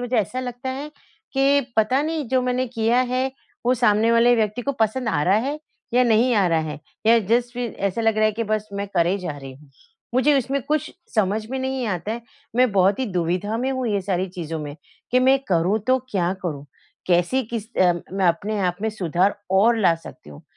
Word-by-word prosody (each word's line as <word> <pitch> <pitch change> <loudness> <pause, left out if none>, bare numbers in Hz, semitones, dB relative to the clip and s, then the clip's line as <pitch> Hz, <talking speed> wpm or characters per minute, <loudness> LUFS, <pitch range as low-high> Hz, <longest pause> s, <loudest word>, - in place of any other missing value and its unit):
मुझे 245 0 -1
ऐसा 225 +4 0
लगता 250 +1 -5
है 280 +3 -5 0.4
कि 275 +1 +4 0.2
पता 220 +5 +3
नहीं 315 -2 -2
जो 260 -1 +2
मैंने 255 +1 0
किया 230 +2 +3
है 260 +1 0 0.4
वो 250 - +4
सामने 225 -1 +3
वाले 235 +1 +5
व्यक्ति 220 +2 0
को 280 - -1
पसंद 225 +3 +1
आ 145 -6 +1
रहा 185 +5 +3
है 295 +2 -2 0.4
या 250 - +5
नहीं 235 +2 +3
आ 200 -3 +3
रहा 165 -1 +2
है 150 -2 -5 0.3
या 230 +1 +6
जस्ट 240 +1 +2
फिर 245 -2 -3 0.2
ऐसा 195 - -4
लग 225 -1 +2
रहा 215 - +3
है 215 - +3
कि 230 - 0
बस 215 0 -2
मैं 200 - -2
करे 175 +2 +2
जा 175 -6 -5
रही 135 -2 -9
हूँ। 140 +1 -19 0.4
मुझे 280 +3 +4
उसमें 270 +2 -1
कुछ 305 +1 -1 0.2
समझ 215 0 +1
में 265 - -2
नहीं 260 -2 -2
आता 190 +1 -2
है 235 +1 -6 0.3
मैं 250 -1 +4
बहुत 195 +1 +3
ही 260 - -1
दुविधा 180 +5 -1
में 265 - 0
हूँ 260 -2 -2
ये 200 -2 0
सारी 185 -1 -1
चीज़ों 165 -2 -4
में 145 0 -7 0.3
कि 250 - +4
मैं 265 +1 +5
करूँ 180 +4 +2
तो 260 0 +4
क्या 180 -4 0
करूँ, 150 -6 -4 0.4
कैसी 175 +9 +2
किस 220 -2 -4
अ, 180 -1 +5 0.2
मैं 190 -1 +1
अपने 205 +6 -1
आप 180 - -1
में 220 - +1
सुधार 190 0 0
और 225 +5 +4
ला 180 -6 +4
सकती 165 - -13
हूँ? 70 - -13
220 Hz, 220 wpm, -22 LUFS, 185-250 Hz, 0.4 s, या